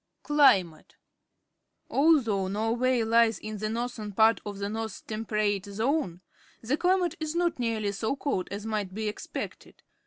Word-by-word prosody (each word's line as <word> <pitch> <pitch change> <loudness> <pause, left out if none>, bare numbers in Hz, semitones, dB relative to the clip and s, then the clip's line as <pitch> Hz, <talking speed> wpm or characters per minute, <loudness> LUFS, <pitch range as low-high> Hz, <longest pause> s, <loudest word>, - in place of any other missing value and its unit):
Climate. 225 - +3 0.5
— - - -53
Although 260 -10 +3
Norway 230 +5 +1
lies 230 -1 +3
in 215 -1 -7
the 215 +1 -2
northern 230 -2 -4
part 220 +3 +4
of 205 -1 -5
the 200 0 -3
North 220 0 -5
Temperate 215 -2 -1
Zone, 220 - -1 0.4
the 245 +5 -1
chmate 360 0 +2
is 315 0 -3
not 345 -4 0
nearly 225 -4 -1
so 220 +6 -2
cold 270 -10 -2
as 200 +2 -6
might 210 -4 -3
be 215 0 -2
expected. 210 - -7
220 Hz, 150 wpm, -28 LUFS, 205-255 Hz, 0.5 s, part